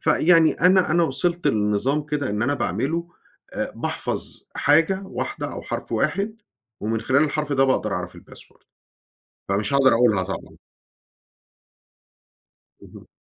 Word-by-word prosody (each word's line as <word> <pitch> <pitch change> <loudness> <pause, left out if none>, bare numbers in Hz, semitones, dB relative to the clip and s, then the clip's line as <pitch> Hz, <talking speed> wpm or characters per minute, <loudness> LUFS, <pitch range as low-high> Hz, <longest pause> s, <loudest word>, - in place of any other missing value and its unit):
فيعني 160 +1 +4
أنا 180 0 +3
أنا 170 +1 +3
وصلت 170 +4 -1
لنظام 105 +8 +1
كده 145 -5 -2
إن 105 +1 -1
أنا 145 +4 +1
باعمله 170 +5 -2 0.4
آآ، - - -3
باحفظ - - -4
حاجة 165 +7 +3
واحدة - - -4
أو - - -7
حرف - - -5
واحد، 210 +3 -1 0.4
ومن 110 +1 -1
خلال 130 +6 +3
الحرف 150 -1 -2
ده 135 0 +3
باقدر 120 -6 0
أعرف 90 -1 -4
الpassword. - - -16 0.8
فمش 100 +5 -1
هاقدر 135 -2 +5
أقولها 115 -5 +3
طبعًا. 95 +1 -7 2.3
اهم. - - -14
140 Hz, 125 wpm, -23 LUFS, 110-165 Hz, 2.3 s, هاقدر